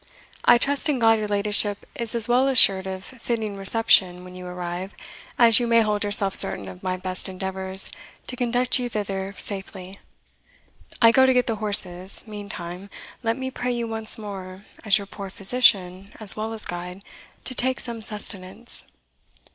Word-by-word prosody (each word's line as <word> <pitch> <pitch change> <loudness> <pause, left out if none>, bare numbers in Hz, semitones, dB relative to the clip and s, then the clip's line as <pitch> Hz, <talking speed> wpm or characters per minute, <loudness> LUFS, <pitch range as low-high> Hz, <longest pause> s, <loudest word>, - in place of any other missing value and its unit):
I - - +6
trust 285 +5 0
in 285 - 0
God 225 -2 +3
your 210 - -4
ladyship 205 0 -1
is 235 -1 -5
as 230 -1 0
well 250 +2 +2
assured 195 -8 +6
of 190 0 -7
fitting 230 -4 -5
reception 195 -3 +4
when 180 0 -13
you 180 0 -10
arrive, 180 +2 -7 0.4
as 230 -1 +6
you 240 - -2
may 230 0 +3
hold 210 -1 -1
yourself 205 -1 +3
certain 100 - +4
of 90 -1 -11
my 185 0 -3
best 185 0 -3
endeavours 190 0 0 0.3
to 255 - -4
conduct 245 +1 0
you 245 -1 -4
thither 195 -2 -5
safely. 195 -1 -3 1.0
I 230 - +7
go 260 +2 +4
to 260 - +3
get 250 -1 +2
the 225 -2 -3
horses; 195 -3 +3
meantime, 200 -3 -8 0.3
let 230 -1 -2
me 260 0 -5
pray 250 -1 -3
you 235 -1 -4
once 220 -1 0
more, 195 -2 -9 0.2
as 215 -3 +3
your 200 - -7
poor 195 0 -9
physician 195 -3 +1
as 215 -3 +1
well 220 +1 -5
as 220 - 0
guide, 180 +2 -8 0.4
to 255 - -4
take 255 +1 -1
some 235 -2 -7
sustenance." 210 +1 -3
205 Hz, 170 wpm, -22 LUFS, 190-230 Hz, 1.0 s, I